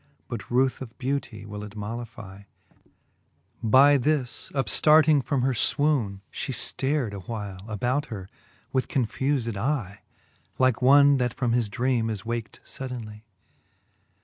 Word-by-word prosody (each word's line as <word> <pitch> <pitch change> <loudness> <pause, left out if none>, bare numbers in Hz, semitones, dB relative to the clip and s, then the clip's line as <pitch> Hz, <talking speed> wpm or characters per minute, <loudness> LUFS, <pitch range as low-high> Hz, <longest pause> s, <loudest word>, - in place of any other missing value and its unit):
But - - -6
ruth 130 +2 +1
of 120 -3 -9
beautie 130 -6 -3
will 105 0 -7
it 105 0 -10
mollifie. 105 -2 -8 1.1
By 135 +5 +6
this 130 -3 -1
upftarting 150 +1 +4
from 130 0 -1
her 135 0 +2
fwoone, 120 -6 +1
(he - - -4
ftar'd 135 -5 +1
A 100 - -6
while 100 -1 -6
about 125 +7 -1
her 100 -7 -7 0.5
with 130 -1 +1
confufed 130 -1 -1
eye 110 -3 -2
j - - -39 0.5
Like 130 -2 +2
one, 140 +2 +6
that 125 -2 -1
from 125 -3 0
his 115 -3 +1
drcame 120 0 0
is 110 -1 -5
waken 115 -1 -5
fuddenlye. 120 -5 -7
120 Hz, 135 wpm, -26 LUFS, 105-135 Hz, 1.1 s, By